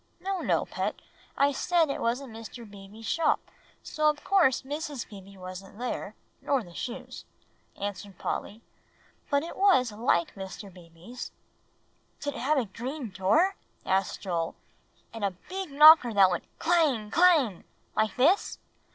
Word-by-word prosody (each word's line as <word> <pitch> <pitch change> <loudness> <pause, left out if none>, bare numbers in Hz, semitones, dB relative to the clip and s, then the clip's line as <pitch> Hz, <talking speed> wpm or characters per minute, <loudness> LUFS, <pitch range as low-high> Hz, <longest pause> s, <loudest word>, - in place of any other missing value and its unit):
"No, 385 0 -2
no, - - +1
Pet; - - -3 0.4
I 280 +1 +4
said 330 +1 +2
it - - -4
wasn't 240 +1 -2
Mr. 230 +1 -9
Beebe's 205 +2 -12
shop, 330 +6 +2 0.4
so 305 0 +1
of 300 -1 -3
course 345 -12 +3
Mrs. 290 -1 -5
Beebe 195 -1 -12
wasn't 185 +2 -9
there, 245 +2 -4 0.3
nor 275 -4 +1
the 175 -3 -14
shoes," 255 +5 -6 0.6
answered 200 -1 -5
Polly; 215 +3 -4 0.7
"but 285 +1 +2
it 335 - -7
was 370 - +4
like 210 -6 +1
Mr. 195 0 -8
Beebe's." 175 +7 -10 0.9
"Did 285 0 -3
it - - -7
have 290 +4 +1
a 255 - +1
green 245 +4 -6
door?" 215 - +3 0.3
asked 190 0 0
Joel, 170 -4 -2 0.6
"and 225 -2 -6
a 195 -3 -1
big 380 -1 -4
knocker 300 -3 +8
that 195 -3 +5
went 175 - -2
clang 290 -11 +2
clang 315 - +4 0.3
like 215 -2 +1
this?" 320 +11 +3
240 Hz, 145 wpm, -28 LUFS, 195-300 Hz, 0.9 s, knocker